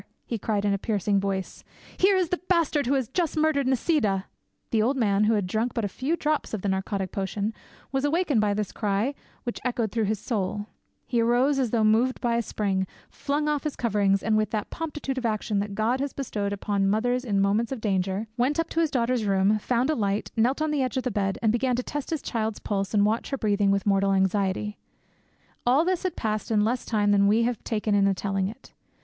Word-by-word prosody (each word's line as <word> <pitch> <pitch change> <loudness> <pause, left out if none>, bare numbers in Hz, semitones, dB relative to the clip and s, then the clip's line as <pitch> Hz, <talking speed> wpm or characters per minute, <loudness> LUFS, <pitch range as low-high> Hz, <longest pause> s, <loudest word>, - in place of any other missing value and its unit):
he 230 - -3
cried 205 0 -1
in 200 - +2
a 200 - -1
piercing 205 -2 +1
voice, 195 -1 -3 0.3
"here 385 +1 +4
is 360 -3 +1
the 360 - -2
Bastard 320 -6 +2
who 275 - +2
Has 260 -4 0
just 325 - -1
murdered 305 -3 +2
Nisida!" 235 - +1 0.5
The 225 - +3
old 260 +5 +1
man, 210 -3 +2
who 225 - +3
had 205 -3 0
drunk 220 +6 -1
but 230 - 0
a - - +1
few 265 - -1
drops 300 -7 -1
of 200 - -7
the 200 - 0
narcotic 190 0 -2
potion, 200 +2 -2 0.4
was 270 0 0
awakened 290 -5 +2
by 205 -1 +1
this 210 -2 -2
cry 210 +5 0 0.3
which 240 - -4
echoed 235 -4 -1
through 225 -2 0
his 215 +2 0
soul; 205 -1 -2 0.4
he 240 -3 +1
arose 250 +5 +3
as 255 -3 +1
though 225 -1 +1
moved 230 +4 +3
by 235 -2 0
a 235 - +2
spring, 195 -4 -1 0.2
flung 295 +2 -1
off 300 -1 0
his 300 -2 -3
coverings, 200 -4 +1
and 220 -1 +2
with 215 0 +1
that 215 -2 -3
promptitude 300 -4 -4
of 245 - -5
action 215 -1 -1
that 200 0 -3
God 225 +5 +1
has 280 0 -2
bestowed 210 -7 -3
upon 200 -1 0
mothers 245 +4 +1
in 205 -6 0
moments 205 +5 +1
of 265 - -3
danger, 195 0 -1
event 275 +6 +2
up 330 - 0
to 330 - 0
his 325 -2 +3
daughter's 245 -3 0
room, 200 +2 +3
found 245 +6 +1
a - - 0
light, 205 -3 -1
knelt 250 +6 +2
on 310 - 0
the 295 -2 +1
edge 255 0 -1
of 260 - 0
the 250 - -1
bed, 195 -2 -1
and 220 - +4
began 245 +2 +1
to 250 - -2
test 290 +1 -5
his 320 -4 -2
child's 220 -2 -2
pulse 200 0 -2
and 205 0 +5
watch 220 +2 0
her 275 - -2
breathing 205 -3 +1
with 200 0 +1
mortal 195 -1 +3
anxiety. 195 +2 0 0.8
All! 265 +7 +3
this 365 -1 0
had 370 -3 -2
passed 215 -1 -2
in 210 -2 +3
less 245 +2 -1
time 205 -2 +1
than 200 0 +4
we 220 +3 +4
have 240 -2 -1
taken 215 -1 -1
in 200 -1 +4
telling 195 0 -1
it. 225 +7 -11
220 Hz, 230 wpm, -26 LUFS, 200-260 Hz, 0.8 s, and